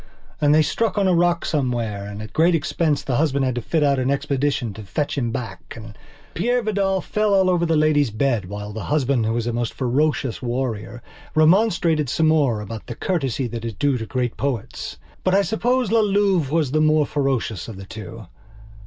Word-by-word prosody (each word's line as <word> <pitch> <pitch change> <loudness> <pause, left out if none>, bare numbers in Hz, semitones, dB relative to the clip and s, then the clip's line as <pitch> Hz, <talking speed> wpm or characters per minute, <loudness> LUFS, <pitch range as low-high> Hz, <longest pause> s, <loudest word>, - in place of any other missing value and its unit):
And 145 -1 +4
they 155 - +5
struck 225 +7 -1
on 200 -2 +3
a 185 - +3
rock 175 0 +2
somewhere, 120 -8 -1
and, 105 +1 -7
at 110 - -10
great 165 +2 +4
expense, 155 -1 0
the 130 -4 -1
husband 140 -3 +1
had 130 - 0
to 120 - -3
fit 160 +5 0
out 140 -2 +2
an 130 +1 0
expedition 140 -4 -1
to 110 - -9
fetch 140 +9 -2
him 125 -5 -1
back. 115 0 -6
And 110 -2 -10 0.4
Peire 245 +6 0
Vidal 195 -3 +1
fell 210 +1 +1
all 190 -1 +4
over 170 -1 +1
the 165 - +2
Lady's 150 -3 +3
bed 110 -2 0
while 105 +1 -6
the 110 -1 -5
husband, 135 -6 +1
who 110 - 0
was 115 -1 -1
a 120 - -2
most 120 -1 -2
ferocious 135 0 0
warrior, 120 -2 -3 0.3
remonstrated 165 - +3
some 160 +4 +2
more 140 -9 +2
about 105 +1 -8
the 120 - -6
courtesy 135 - -1
that 115 0 -6
is 115 -3 -4
due 140 +4 +1
to 110 - -5
great 125 -2 -2
poets. 125 -4 -4 0.3
But 185 0 +2
I 200 - +4
suppose 240 +3 0
La 230 - +4
Louve 200 -7 +2
was 155 -3 +1
the 155 +1 +2
more 155 -1 +4
ferocious 135 - -1
of 110 -4 -8
the 95 - -9
two. 110 +1 -9
140 Hz, 205 wpm, -22 LUFS, 120-165 Hz, 0.4 s, they